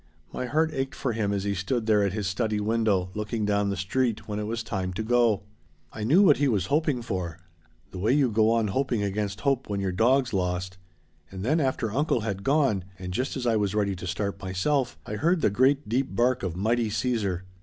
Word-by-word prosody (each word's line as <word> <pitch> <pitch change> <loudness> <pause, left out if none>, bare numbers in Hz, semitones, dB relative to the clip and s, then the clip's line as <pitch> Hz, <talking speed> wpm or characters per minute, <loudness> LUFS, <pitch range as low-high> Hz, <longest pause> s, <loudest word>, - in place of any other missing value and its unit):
My 125 - -3
heart 155 +4 +1
ached 135 -1 -3
for 130 - -2
him 105 -2 -1
as 100 -1 -1
he 100 0 0
stood 110 +5 -2
there 105 -2 +4
at 100 -1 +1
his 105 +1 -3
study 105 +3 -1
window 105 -4 +1
looking 105 +1 -2
down 100 0 +1
the 100 - -2
street 115 +5 -1
when 105 -1 -3
it 105 - -3
was 115 +1 -3
time 95 -3 -3
to 110 +5 -3
go. 115 -3 +2 0.5
I 110 - -5
knew 160 - +5
what 155 -7 +6
he 145 - +2
was 105 -9 +1
hoping 150 -5 +1
for 90 -6 -4 0.5
the 90 - -7
way 105 +6 +2
you 135 -3 +3
go 110 0 +3
on 115 -2 +2
hoping 125 -1 0
against 100 0 -2
hope 135 -3 0
when 100 -1 -1
your 95 -1 -1
dog's 125 +6 +2
lost. 90 0 -2 0.5
And 95 +1 -6
then 155 +6 +2
after 130 -6 0
uncle 140 -2 +1
had 100 -3 -3
gone, 135 -9 +2
and 90 0 -6
just 130 +7 -2
as 125 - -4
I 115 -2 +3
was 105 -1 0
ready 100 -2 +1
to 90 - -6
start 100 +3 -3
myself, 120 +9 0
I 105 - -4
heard 170 - +2
the 105 - +3
great 135 +6 +2
deep 130 +5 -1
bark 125 +1 +2
of 90 -4 -3
mighty 110 +4 +1
Caesar! 105 -4 -1
110 Hz, 225 wpm, -26 LUFS, 100-130 Hz, 0.5 s, what